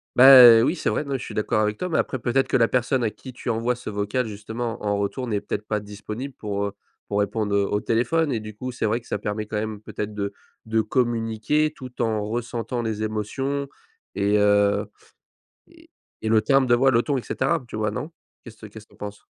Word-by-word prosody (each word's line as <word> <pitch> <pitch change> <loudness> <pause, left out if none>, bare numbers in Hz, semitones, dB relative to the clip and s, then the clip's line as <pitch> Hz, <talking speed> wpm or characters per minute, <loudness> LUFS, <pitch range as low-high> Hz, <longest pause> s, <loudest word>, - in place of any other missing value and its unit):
Beh, 125 -3 +10
heu, - - +3
oui, 150 +8 +1
c'est - - 0
vrai, - - -1
non, 140 -2 -2
je 125 - -8
suis - - -8
d'accord 105 0 0
avec 105 0 0
toi, 180 - -3
mais 165 - 0
après 130 - -1
peut-être 125 +3 +1
que - - -1
la 115 -2 +4
personne 130 0 +1
à 110 - +2
qui 130 +4 -11
tu 120 - -6
envoies 115 +2 0
ce 125 -1 -7
vocal, 105 +4 -1
justement, 110 +2 -5
en 105 - -1
en 100 - +1
retour 100 +6 -2
n'est 105 -3 -1
peut-être 105 +1 -5
pas 105 -1 -1
disponible 105 +6 -7
pour 100 -1 -3
heu, - - -5 0.4
pour 100 - 0
répondre 105 0 -1
heu, 100 0 +3
au 105 0 0
téléphone 145 +7 +1
et 115 - 0
du 110 -1 -9
coup, 130 +4 -5
c'est 120 - -3
vrai 110 +3 0
que 115 - -20
ça - - -2
permet 105 +1 -3
quand 105 0 -4
même 110 -1 -4
peut-être 105 0 -5
de 100 -1 -3 0.4
de 110 0 +1
communiquer 120 +5 0
tout 125 -2 -8
en 110 -2 0
ressentant 120 +1 -3
les 110 -2 -3
émotions 135 +7 -2 0.5
et 100 +1 +2
heu 105 0 +3 0.8
et - - -20 0.3
et 110 - -2
le 110 -1 +4
timbre 135 +2 +3
de 120 - +5
voix, 135 +3 +4
le 120 -2 +4
ton, 145 -2 0
et - - -2
cetera. 130 +3 -1
Tu - - -8
vois? 105 -1 -1
Non? 145 +9 -5 0.4
Qu'est-ce 110 -2 -11
que - - -7
qu'est-ce 105 +1 -12
que - - -34
tu - - -19
en - - -26
penses? 105 0 -8
110 Hz, 245 wpm, -24 LUFS, 105-125 Hz, 0.8 s, Beh